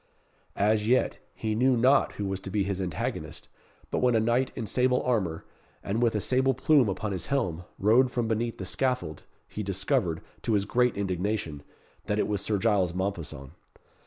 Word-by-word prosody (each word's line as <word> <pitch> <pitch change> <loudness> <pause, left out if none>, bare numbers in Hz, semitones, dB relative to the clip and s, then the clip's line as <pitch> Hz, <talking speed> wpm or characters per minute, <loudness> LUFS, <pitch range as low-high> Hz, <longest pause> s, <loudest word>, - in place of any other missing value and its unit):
As 105 +1 +2
yet, 125 +2 +2 0.2
he 110 -1 -2
knew 125 +3 +3
not 130 +4 +4
who 100 - -4
was 95 -1 -2
to 95 - -7
be 100 +1 0
his 95 -1 -2
antagonist; 90 -4 -4 0.4
but - - 0
when 125 -2 +3
a - - +4
knight 120 +4 +1
in 115 - -4
sable 125 +4 +2
armour, 95 -10 -1 0.4
and 105 +4 -1
with 115 -2 +2
a - - +1
sable 130 +2 +2
plume 140 -4 +4
upon 100 +2 -3
his 95 -3 -4
helm, 90 -12 -1
rode 120 +6 +4
from 120 -2 -1
beneath 115 +1 -1
the 95 - -5
scaffold, 125 - -1 0.3
he 105 - -6
discovered, 95 -4 0 0.2
to 115 - -1
his 100 -1 +2
great 125 +2 +1
indignation, 95 -5 -2 0.4
that 105 - -1
it - - +1
was 105 -2 -1
Sir 105 +1 0
Giles 95 -5 +1
Mompesson. 85 -8 -4
105 Hz, 185 wpm, -28 LUFS, 95-120 Hz, 0.4 s, not